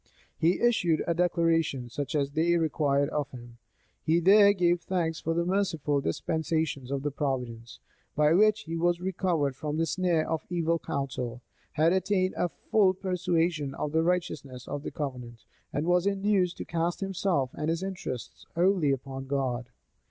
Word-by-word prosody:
He 170 +3 +2
issued 180 -10 +2
a 170 - +1
declaration, 165 -6 +1
such 145 +3 -4
as 140 -1 0
they 170 +3 +2
required 145 -3 +1
of 145 -2 -2
him.[] 120 -3 -12 0.4
He 165 +2 +2
there 200 +3 +7
gave 175 -3 +2
thanks 170 -4 -1
for 165 +1 -2
the 170 0 +1
merciful 165 -7 0
dispensations 155 - -1
of 140 0 -2
Providence, 125 -5 -3 0.4
by 150 +1 +4
which 210 +3 +4
he 165 -4 -5
was 175 +1 +1
recovered 175 -6 0
from 150 +2 -3
the 165 - +2
snare 175 -2 +1
of 160 -1 -1
evil 170 -1 0
counsel, 125 -4 -4 0.3
had 160 +3 +3
attained 190 0 +1
a 175 - 0
full 190 +1 +2
persuasion 175 -6 -1
of 150 - -3
the 160 +1 +2
righteousness 155 -7 -2
of 145 0 -4
the - - -5
covenant, 125 -5 -6 0.3
and 145 +3 -1
was 180 +2 +3
induced 195 -2 +1
to - - -5
cast 170 +2 -2
himself 185 -8 0
and 155 +1 -3
his 165 +2 -1
interests 185 -10 -6
wholly 175 -3 +3
upon 135 0 -3
God. 130 -3 -2
165 Hz, 160 wpm, -28 LUFS, 140-180 Hz, 0.4 s, there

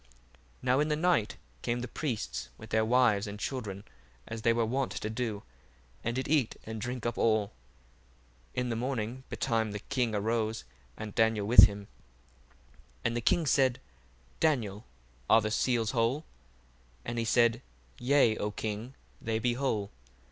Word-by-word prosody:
1:15 60 - -29 0.6
Now 130 +1 +3
in 150 - +2
the 150 - +1
night 165 -9 +1 0.2
came 120 0 -1
the 125 - -4
priests 115 - -3
with 110 - -12
their 110 0 +3
wives 115 -3 +3
and 100 0 -7
children, 105 -6 -4 0.4
as 115 0 -5
they 115 +2 +4
were 115 0 +2
wont 130 +4 -1
to 110 - -4
do, 110 -3 -3 0.6
and 115 +1 -1
did 130 - -2
eat 145 -6 +2
and 110 -1 -6
drinck 125 0 -4
up 120 -1 -2
all. 110 -3 +2
1:16 - - -31 1.0
In 125 -1 -1
the 115 - -1
morning 125 0 -3
betime 110 -2 0
the 105 - -4
king 120 0 -1
arose, 110 +1 -1 0.3
and 105 -2 -6
Daniel 110 -2 +2
with 115 +4 +10
him. 100 0 -3
1:17 100 - -14 1.2
And 115 - +1
the 120 - -1
king 165 +7 +2
said, 130 -2 +3 0.6
Daniel, 115 -9 0 0.4
are 110 - +7
the 110 0 -2
seals 115 -1 +1
whole? 125 +6 0 0.8
And 120 0 -3
he - - +1
said, 115 0 +3 0.4
Yea, 125 -3 +4
O 105 - -1
king, 110 +4 -5 0.3
they 115 -1 -1
be 120 +2 +1
whole. 115 -6 -1
115 Hz, 170 wpm, -30 LUFS, 110-125 Hz, 1.2 s, with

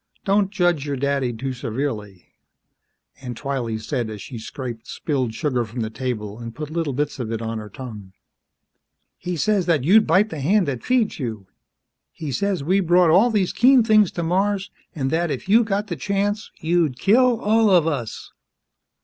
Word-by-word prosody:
Don't 200 -1 +2
judge 175 -7 +1
your 140 - -1
daddy 135 -1 0
too 130 +3 -4
severely," 115 -6 -5 0.9
Aunt 125 -3 -6
Twylee 130 -6 -3
said 115 +1 -3
as 105 -1 -7
she 115 +4 -8
scraped 120 0 -7
spilled 130 -7 -2
sugar 130 -5 0
from 115 +2 -6
the 110 0 -3
table 110 -3 -4
and 115 -1 -8
put 150 0 -6
little 165 -4 -2
bits 145 +1 -2
of 115 -3 -4
it 115 - -2
on 115 0 -4
her 105 -1 -9
tongue. 105 -5 -9 1.1
"He 180 0 -3
says 200 0 +1
that 160 -6 +2
you'd 210 +8 +5
bite 195 +6 +3
th' 155 - -5
hand 185 +5 +2
that 130 -4 -3
feeds 245 -7 +1
you. 110 -7 -4 0.7
He 155 -3 -6
says, 190 +3 -1
we 185 +6 +2
brought 175 -2 +4
all 200 +9 +5
these 205 -5 0
keen 255 0 +5
things 215 -4 +4
to 170 - -3
Mars, 195 +3 0 0.2
an' 135 -4 -1
that 170 +2 0
if 135 - -4
you 225 +4 +5
got 205 -1 -1
th' 175 -7 -5
chance, 205 +4 -1
you'd 160 -5 +1
kill 240 - +3
all 220 0 +3
of 175 -5 +5
us!" 135 -9 -4
150 Hz, 185 wpm, -22 LUFS, 120-195 Hz, 1.1 s, you'd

